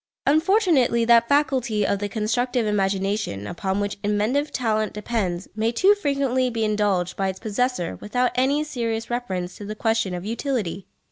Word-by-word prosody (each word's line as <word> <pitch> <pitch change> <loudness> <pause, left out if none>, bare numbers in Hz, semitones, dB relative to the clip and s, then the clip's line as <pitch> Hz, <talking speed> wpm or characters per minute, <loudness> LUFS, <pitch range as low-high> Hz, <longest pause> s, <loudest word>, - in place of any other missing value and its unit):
Unfortunately 310 - +3
that 235 0 +5
faculty 260 -7 +2
of 200 - 0
the 205 0 -3
constructive 235 +3 0
imagination 195 - -1
upon 190 - -2
which 205 0 -3
inventive 215 +8 0
talent 215 -4 0
depends 200 -5 -2
may 220 +1 +1
too 375 - +5
frequently 275 -8 0
be 225 -2 -2
indulged 205 -4 0
by 195 - -1
its 190 0 -3
possessor 225 -4 -1
without 245 +4 0
any 275 +4 +2
serious 230 -6 -3
reference 185 -7 -3
to - - -9
the 215 +1 -5
question 225 -4 0
of 175 +1 -6
utility. 220 - -3
225 Hz, 155 wpm, -23 LUFS, 200-255 Hz, -, that